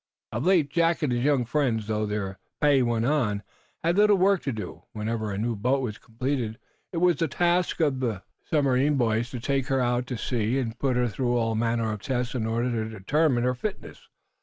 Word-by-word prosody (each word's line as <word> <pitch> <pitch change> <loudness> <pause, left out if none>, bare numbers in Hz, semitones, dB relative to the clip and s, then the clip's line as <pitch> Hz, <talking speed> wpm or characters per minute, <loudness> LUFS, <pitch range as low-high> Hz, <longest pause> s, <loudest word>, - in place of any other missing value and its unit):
Of 120 +9 -2
late 165 -7 +3
Jack 165 +1 +2
and 135 -5 +1
his 120 0 0
young 140 -3 +2
friends, 120 -4 0
though 110 0 -1
their 100 -2 -3 0.2
pay 145 -2 +4
went 120 -2 +1
on, 115 -8 +1 0.4
had 170 +3 +2
little 210 0 +6
work 195 0 +3
to 140 - -2
do. 110 -3 -6
Whenever 110 0 -2
a 100 - -3
new 115 +2 -1
boat 130 +6 +1
was 110 -3 -4
completed 120 -1 -3 0.3
it 175 - -4
was 175 0 +3
the 165 - +1
task 175 +4 +1
of 140 -5 +2
the 115 -7 -2 0.2
submarine 140 -1 +2
boys 120 -2 +1
to 125 - -5
take 135 +2 -1
her 135 0 +1
out 125 0 0
to 125 - -3
sea 120 +1 -1
and 115 -3 -3
put 135 -3 +1
her 125 0 +2
through 120 +3 0
all 115 -1 +1
manner 115 0 0
of 105 -2 -5
tests 125 -1 -2
in 115 -4 -1
order 120 +2 0
to 110 -2 -2
determine 120 +5 +1
her 125 0 +2
fitness. 195 - -6
125 Hz, 210 wpm, -26 LUFS, 115-145 Hz, 0.4 s, little